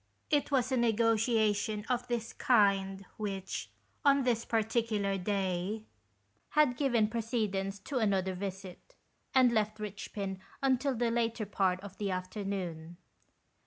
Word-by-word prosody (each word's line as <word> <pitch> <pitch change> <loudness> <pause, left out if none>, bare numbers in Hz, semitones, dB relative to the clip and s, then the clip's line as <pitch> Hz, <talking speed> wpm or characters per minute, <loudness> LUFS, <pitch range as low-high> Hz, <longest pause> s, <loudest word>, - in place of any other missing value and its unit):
It 290 -1 +2
was 260 -2 +1
a 260 - +2
negotiation 220 -2 +2
of 245 -1 -1
this 235 -2 -2
kind 195 -4 +2
which, 195 -3 -4 0.3
on 280 -2 +5
this 235 -2 +1
particular 220 -3 0
day, 195 +1 -1 0.7
had 300 -5 +3
given 240 -6 +2
precedence 215 -4 -1
to 260 +5 -2
another 190 -4 +1
visit, 190 - -7 0.4
and 255 -2 +6
left 215 -1 +1
Eichpin 200 -2 -5 0.2
until 265 0 +2
the 235 0 +1
later 230 -1 0
part 190 -2 +1
of 200 0 -10
the 205 -2 -1
afternoon. 185 -3 -4
215 Hz, 125 wpm, -32 LUFS, 195-235 Hz, 0.7 s, and